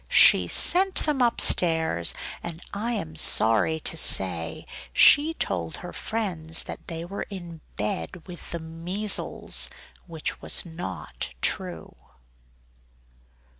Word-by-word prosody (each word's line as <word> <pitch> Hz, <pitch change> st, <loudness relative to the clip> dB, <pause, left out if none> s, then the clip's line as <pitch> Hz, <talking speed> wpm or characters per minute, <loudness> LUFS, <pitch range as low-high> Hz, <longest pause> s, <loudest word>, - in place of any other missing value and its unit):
She -, -, +6 dB
sent 375 Hz, +1 st, +3 dB
them 295 Hz, -4 st, 0 dB
upstairs; 160 Hz, -, +2 dB, 0.3 s
and 170 Hz, 0 st, -8 dB
I 225 Hz, +4 st, -3 dB
am 165 Hz, -8 st, -5 dB
sorry 115 Hz, +1 st, +4 dB
to -, -, -4 dB
say 85 Hz, -, +2 dB, 0.3 s
she 300 Hz, -, +5 dB
told -, -, -3 dB
her -, -, -9 dB
friends 175 Hz, -8 st, -2 dB
that -, -, -10 dB
they 165 Hz, 0 st, -6 dB
were 195 Hz, +3 st, -6 dB
in 175 Hz, -5 st, -9 dB
bed 105 Hz, -, -4 dB
with 175 Hz, -2 st, -11 dB
the 170 Hz, -, -4 dB
measles; 170 Hz, +6 st, 0 dB, 0.4 s
which 160 Hz, -3 st, -6 dB
was -, -, -1 dB
not 95 Hz, -, -7 dB
true. 180 Hz, -, -2 dB
165 Hz, 115 wpm, -25 LUFS, 160-200 Hz, 0.4 s, She